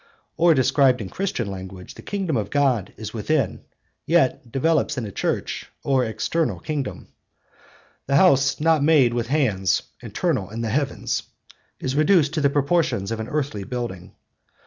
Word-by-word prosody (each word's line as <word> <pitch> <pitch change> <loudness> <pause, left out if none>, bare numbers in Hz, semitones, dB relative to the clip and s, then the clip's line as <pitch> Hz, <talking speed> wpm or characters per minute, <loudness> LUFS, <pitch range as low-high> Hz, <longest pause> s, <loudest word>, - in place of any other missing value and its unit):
Or, 170 -1 +4
described 130 -1 +3
in 100 -4 -5
Christian 190 - -2
language, 95 -1 -8
the - - -12
kingdom 190 -7 -2
of 110 -3 -1
God 135 -8 +1
is 110 0 -7
within, 135 +6 +1
and - - -12 0.5
yet 135 -7 +2
developes 150 +2 +1
into 110 -5 -3
a - - -20
Church - - -2
or 135 -2 +2
external 120 +9 -1
kingdom; 150 -4 -4 1.0
'the 140 - +1
house 140 -4 +4
not 160 -1 +3
made 145 -6 +4
with 120 -1 -1
hands, 115 - +1 0.2
eternal - - -2
in 115 +2 -5
the 115 - -2
heavens,' 140 +2 -1 0.6
is 130 +1 -3
reduced 155 0 +3
to 155 - 0
the 140 - +4
proportions 140 - 0
of 115 - -3
an 110 +2 -5
earthly 140 -9 -2
building. 105 -6 -6
135 Hz, 160 wpm, -23 LUFS, 115-155 Hz, 1.0 s, Or